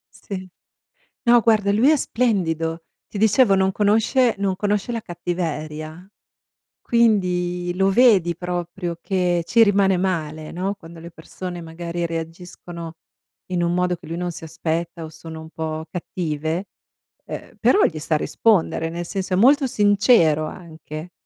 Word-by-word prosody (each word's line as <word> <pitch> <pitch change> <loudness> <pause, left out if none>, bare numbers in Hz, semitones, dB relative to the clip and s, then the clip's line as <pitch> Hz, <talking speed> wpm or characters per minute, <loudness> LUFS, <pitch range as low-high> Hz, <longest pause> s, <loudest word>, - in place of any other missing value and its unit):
Sì. 190 -3 -7 0.8
No, 240 -1 +5
guarda, 210 -2 +3
lui 235 +7 +4
è 310 - +4
splendido. 165 -10 -1 0.3
Ti - - -7
dicevo, 220 0 +4
non 190 0 +2
conosce 225 +4 +3
non 195 -2 0
conosce 205 +3 -1
la 230 - -3
cattiveria, 165 -1 -5 0.7
quindi 180 -6 +1
lo 195 +1 +2
vedi 195 -7 +4
proprio 175 0 -4
che 180 -3 +1
ci 230 +5 +5
rimane 195 -2 +3
male, 155 -4 -2
no, 190 +4 -2
quando 165 -2 -13
le 170 +1 -9
persone, 175 +2 -8
magari, 170 +1 -4
reagiscono 165 0 -7 0.6
in 180 -1 0
un 170 0 0
modo 180 0 +1
che - - -15
lui 165 - -5
non 175 0 -2
si 165 - -9
aspetta 165 +1 -3
o 160 - -6
sono 160 0 -10
un 160 0 -11
po' 160 0 -4
cattive, 165 0 -3 0.6
uhm, - - -8
però 410 - +4
gli 155 - 0
sa 155 +1 0
rispondere. 170 -1 +1
Nel 170 +1 -5
senso, 190 -1 -3
è - - +2
molto 270 +7 +5
sincero, 205 - +3
anche. 160 0 -9
175 Hz, 145 wpm, -22 LUFS, 165-200 Hz, 0.8 s, No